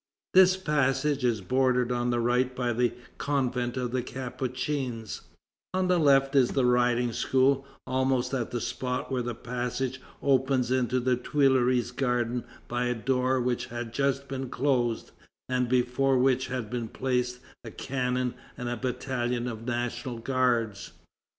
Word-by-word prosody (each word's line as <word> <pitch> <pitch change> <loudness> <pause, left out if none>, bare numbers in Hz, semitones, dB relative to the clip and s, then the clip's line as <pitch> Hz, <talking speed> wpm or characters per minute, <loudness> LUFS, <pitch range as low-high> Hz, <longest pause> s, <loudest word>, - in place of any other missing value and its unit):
This 185 0 +7
passage 145 -4 +1
is 115 -4 +1
bordered 125 +4 +2
on 120 0 0
the 120 0 +1
right 125 +2 +1
by 120 -1 0
the 120 0 +2 0.3
convent 125 -3 -1
of 125 -2 -2
the 130 0 0
Capuchins; 130 -2 -4 0.5
on 185 -1 +1
the 180 -1 +4
left 135 -2 +4
is 130 -3 +4
the 135 -2 +2
Riding 125 -1 +2
School, 135 +2 +2 0.2
almost 130 0 0
at 125 -4 -1
the 120 - -2
spot 125 0 -3
where 130 -1 0
the 120 -1 -3
passage 125 +2 -3 0.2
opens 130 -2 +2
into 130 -1 +2
the 125 0 +2
Tuileries 130 -2 +2
Garden 125 -2 0 0.2
by 120 +1 -1
a 125 0 0
door 130 +2 +1
which 125 -1 -1
had 120 -1 -6
just 140 +1 0
been 135 -2 -4
closed, 125 -4 0 0.4
and 125 -1 0
before 130 +2 +2
which 130 0 +2
had 125 -4 -4
been 120 -2 -2
placed 125 0 -1 0.3
a 115 - -7
cannon 125 0 -2 0.2
and 125 -2 -3
a 120 - -2
battalion 125 -1 -2
of 115 0 -6
National 120 0 -2
Guards. 115 -4 0
125 Hz, 150 wpm, -28 LUFS, 120-130 Hz, 0.5 s, This